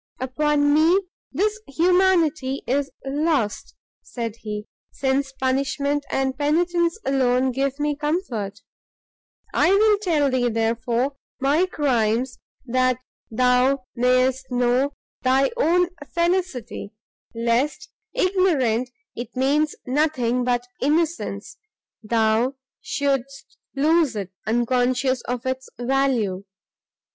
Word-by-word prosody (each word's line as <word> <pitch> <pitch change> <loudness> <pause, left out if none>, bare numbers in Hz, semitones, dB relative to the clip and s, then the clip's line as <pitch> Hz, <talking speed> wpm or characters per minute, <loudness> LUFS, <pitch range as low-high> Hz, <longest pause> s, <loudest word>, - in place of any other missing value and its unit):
"Upon 290 +3 +1
me 325 +5 +5 0.3
this 420 +8 0
humanity 330 -4 +2
is 275 +2 0 0.2
lost," 280 -5 -1 0.3
said 230 -2 -5
he, 210 -2 -6 0.2
"since 270 0 -1
punishment 275 +2 -1
and 265 -1 0
penitence 340 +4 +1
alone 260 -1 +2
give 275 +2 -1
me 295 0 0
comfort. 280 - -3 0.9
I - - +3
will 415 +1 +4
tell 310 -9 +1
thee, 250 -1 +1
therefore, 230 +4 0 0.2
my 290 +7 +2
crimes, 250 - 0 0.3
that 255 0 +2 0.3
thou 250 +3 +2
mayst 255 +1 +2
know 250 +3 +1 0.3
thy 265 +1 +3
own 360 -6 +3 0.3
felicity, 340 - -1 0.4
lest, 245 - 0 0.2
ignorant 335 - +1 0.3
it 240 - -7
means 290 +4 +1
nothing 255 -3 +1
but 245 0 0 0.2
innocence, 320 +4 -1 0.4
thou 225 +3 +1 0.3
shouldst 275 -2 -2 0.2
lose 305 -1 +3
it, 195 -3 -4 0.2
unconscious 250 +2 +1
of 250 0 -3
its 260 0 -3
value. 245 -7 0
265 Hz, 100 wpm, -23 LUFS, 245-300 Hz, 0.9 s, me